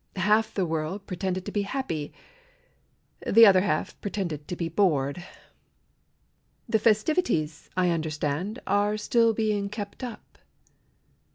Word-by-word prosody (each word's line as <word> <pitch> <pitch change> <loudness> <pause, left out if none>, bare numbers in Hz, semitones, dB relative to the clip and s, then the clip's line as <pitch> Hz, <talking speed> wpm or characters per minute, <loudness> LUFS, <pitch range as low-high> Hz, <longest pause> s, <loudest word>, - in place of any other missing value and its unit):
Half 210 +4 +2
the 190 - +1
world 165 +5 -3
pretended 185 0 -3
to 205 - -5
be 205 - 0
happy, 195 - -3 1.2
The 230 +2 +8
other 190 -3 +6
half 185 -6 -2
pretended 175 -8 -4
to 180 - -4
be 170 -1 -2
bored. 165 -3 +1 1.4
The 220 - +2
festivities, 215 - +1
I 180 -1 +3
understand, 160 - -2
Are 205 +2 +1
still 230 +2 +3
being 210 -2 0
kept 205 +3 -7
up. 240 -3 -9
195 Hz, 120 wpm, -26 LUFS, 165-215 Hz, 1.4 s, The